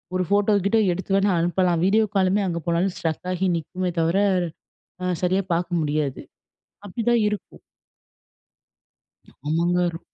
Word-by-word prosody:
ஒரு 185 - +1
photo, 205 +1 +2
keto 220 +3 +3
எடுத்து 190 +2 -2
வேணா 195 +1 +3
அனுப்பலாம். 175 0 +1
வீடியோ 215 +3 +4
காலுமே 195 +1 +3
அங்கே 170 -1 -2
போனாலும் 175 +3 +1
ஸ்ட்ரக் 165 +2 -3
ஆகி 185 +1 0
நிக்குமே 180 +3 -3
தவிர, 165 +3 +2 0.9
அ 180 0 0
சரியா 185 +2 +2
பார்க்க 175 0 -1
முடியாது. 150 -2 -2 0.6
அப்பிடிதான் 230 +3 +1
இருக்கும். 210 -1 -6 1.9
ஆமாங்க, 175 +3 +1
ரொ - - -6
180 Hz, 130 wpm, -23 LUFS, 170-195 Hz, 1.9 s, வீடியோ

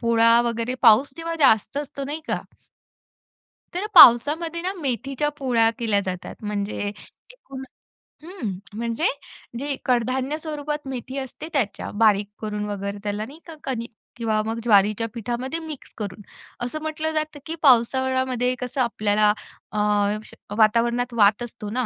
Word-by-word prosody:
पोळा 230 0 +5
वगैरे 235 +1 -2
पाऊस 235 +4 +6
जेव्हा 330 0 -4
जास्त 220 -1 +4
असतो 280 -1 -5
नाही 300 +3 -4
का - - 0 1.4
तर 370 +4 -2
पावसामध्ये 310 +8 +7
ना, 370 +2 -2
मेथीच्या 275 - -2
पोळ्या 235 -4 +3
केल्या 215 -4 +2
जातात. 185 -1 -5
म्हणजे 205 -1 -3 0.5
एकूण 275 - -10 0.6
हं 325 - -5 0.3
म्हणजे 235 +6 -2 0.5
जे 280 0 -2
कडधान्य 255 +4 0
स्वरूपात 300 -2 -4
मेथी 260 +1 -6
असते 265 +3 -6
त्याच्या. 245 -8 -1
बारीक 205 -1 +3
करून 210 -1 -3
वगैरे 200 0 -4
त्याला 205 +1 -2
नाही 285 +7 -12
का, 325 - -9
कणीक 240 -3 -4 0.5
मग 225 +1 -3
ज्वारीच्या 215 0 +3
पिठामध्ये 245 +7 -3
मिक्स 315 -4 -9
करून. 205 -1 -6 0.4
असं 305 +5 -5
म्हटलं 315 0 -2
जातं, 310 -1 -2
की 325 - -4
पावसाळ्यामध्ये 260 0 +3
कसं 250 +1 -2
आपल्याला 215 -3 +2 0.4
अ, 210 - -2 0.5
श - - -14 0.2
वातावरणात 235 +3 +2
वात 210 +2 +4
असतो 230 -3 -7
ना. 245 +3 -1
245 Hz, 135 wpm, -23 LUFS, 220-285 Hz, 1.4 s, पावसामध्ये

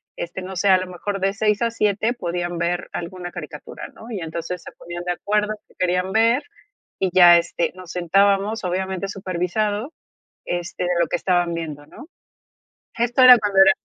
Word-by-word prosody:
este, 175 +2 -6
no 190 +1 -7
sé, 195 +3 +1
a 185 - +7
lo 185 - -5
mejor 195 +2 -4
de 195 +1 0
6 210 +1 +1
a 230 - +2
7 215 +1 0
podían 175 -4 -3
ver 175 +1 -2
alguna 175 +1 -6
caricatura, 150 -3 -8
¿no?, 225 - -13
y 210 -5 -4
entonces 165 +2 -5
se - - -10
ponían 175 0 -8
de 180 - 0
acuerdo 210 +3 -1
que - - -25
querían 180 +1 0
ver, 230 +5 +3 0.6
y 190 - +1
ya, 175 -2 +8
este, 170 0 -1
nos 185 -2 -10
sentábamos 195 +4 +2
obviamente 190 +1 -2
supervisado, 205 - -2 0.5
este, 175 +1 -3
de 180 - -1
lo 170 - +3
que - - 0
estaban 175 -1 +1
viendo, 155 -3 -6
¿no?, 290 - -13 0.9
esto 240 +2 +2
era 250 -1 +10
cuando 205 -2 -2
era 195 0 +8
185 Hz, 180 wpm, -22 LUFS, 175-205 Hz, 0.9 s, era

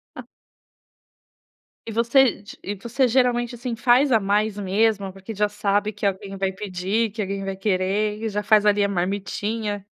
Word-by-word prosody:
Ah. - - -9 1.6
E 225 - -6
você 235 0 +3
d 205 - -12
e 205 +1 -4
você 240 +5 0
geralmente, 240 -1 +1
assim, 240 0 -4
faz 250 +4 +4
a 225 - +5
mais 205 +1 0
mesmo, 200 0 +1
porque 195 +3 -9
já 210 +1 +1
sabe 205 0 0
que 205 0 -6
alguém 195 0 -2
vai 190 0 0
pedir, 195 +3 -2
que 215 0 -4
alguém 195 0 -3
vai 195 -1 -4
querer, 205 +2 0
e 220 - -1
já 210 0 -2
faz 210 0 +4
ali 205 0 +4
a - - +1
marmitinha? 205 +2 -3
210 Hz, 175 wpm, -23 LUFS, 195-225 Hz, 1.6 s, a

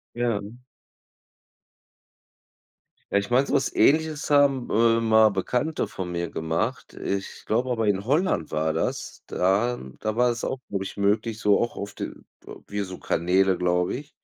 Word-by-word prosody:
Ja. 120 -4 0 2.7
Ja, - - +3
ich 100 +4 -2
meine, 130 +3 +3
so - - -3
was 135 -1 +1
Ähnliches 155 0 +2
haben, 140 -3 +3
äh, 115 +1 +3
mal 110 -1 +5
Bekannte 125 - -1
von 90 -2 -6
mir 85 0 -2
gemacht. 80 +1 -3
Ich 100 0 -4
glaube 125 +4 +1
aber 115 -3 0
in 100 0 +1
Holland 140 - +1
war 80 +1 0
das. 80 - -3
Da 105 +7 +1 0.2
da 110 0 -2
war 125 +1 +3
es 120 -1 -3
auch 130 - -2 0.4
möglich, 105 +2 0
so 105 -1 +3
auch 120 - -1
auf 100 0 -6
de - - -4 0.4
w - - -11
äh, - - -7
wie 105 - -4
so 95 -2 -6
Kanäle, 95 +2 +2
glaube 90 +2 +1
ich. 145 +3 -8
110 Hz, 160 wpm, -25 LUFS, 95-125 Hz, 2.7 s, mal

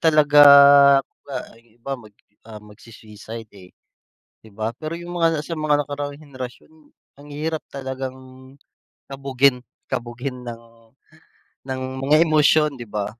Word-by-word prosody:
talaga, 150 -2 +4 1.2
iba 120 +3 -10
mag 105 -2 -17 0.3
ah, 110 - -10
magsui-suicide, 110 +1 -12
eh. 95 -3 -16 0.7
'Di 110 - -18
ba, 110 +1 -3
pero 155 +1 -5
yung 175 +1 -7
mga 165 -2 +1
sa 165 +1 -6
mga 150 -1 +1
nakaraang 145 0 -5
henerasyon, 135 -1 -10 0.5
ang 145 +1 -14
hirap 155 +2 -4
talagang. 130 -1 -6 0.9
Kabugin 135 -1 +1 0.3
kabughin 125 +1 -5
ng 120 -1 -9 1.1
ng 130 -1 -4 0.2
mga 150 +4 +4
emosyon, 155 -1 +3
'di 120 - -8
ba. 105 -1 -3
135 Hz, 120 wpm, -21 LUFS, 115-150 Hz, 1.2 s, talaga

